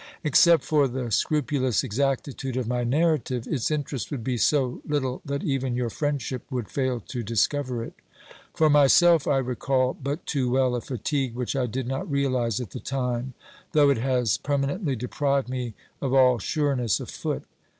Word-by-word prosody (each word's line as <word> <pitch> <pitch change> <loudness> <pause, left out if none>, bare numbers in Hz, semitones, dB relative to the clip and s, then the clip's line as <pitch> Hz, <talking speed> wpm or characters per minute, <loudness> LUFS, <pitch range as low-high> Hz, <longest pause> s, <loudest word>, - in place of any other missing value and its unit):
Except 160 +1 +5
for 150 -3 +3
the 125 -2 -4
scrupulous 140 -1 +1
exactitude 135 +1 -2
of 125 -3 -2
my 125 0 -1
narrative, 130 -3 +1
its 130 -7 -1
interest 145 -6 -3
would 135 -6 -4
be 125 +1 -1
so 130 +1 +1
little 130 -4 -2
that 140 +1 -3
even 135 -6 -1
your 120 -2 -1
friendship 140 -3 -2
would 125 -5 -4
fail 130 -3 -1
to 125 +3 -5
discover 120 +3 0
it. - - -8 0.6
For 160 - +4
myself, 150 +3 +5
1 135 -2 +2
recall 130 +1 0
but 140 +4 -5
too 130 -4 0
well 130 0 +2
a 120 - -1
fatigue 135 0 -2
which 125 +2 -3
I 130 -2 0
did 125 +3 -3
not 135 +4 -3
realise 130 -6 0
at 120 -7 -6
the - - -6
time, 125 -1 -3 0.4
though 145 -2 +5
it 135 - +1
has 125 -3 +1
perma 140 +1 0
nently 145 - -1
deprived 140 +3 0
me 125 -4 -4 0.3
of 135 -1 0
all 125 -2 +5
sureness 135 - 0
of - - -7
foot. - - -3
130 Hz, 175 wpm, -25 LUFS, 125-140 Hz, 0.6 s, Except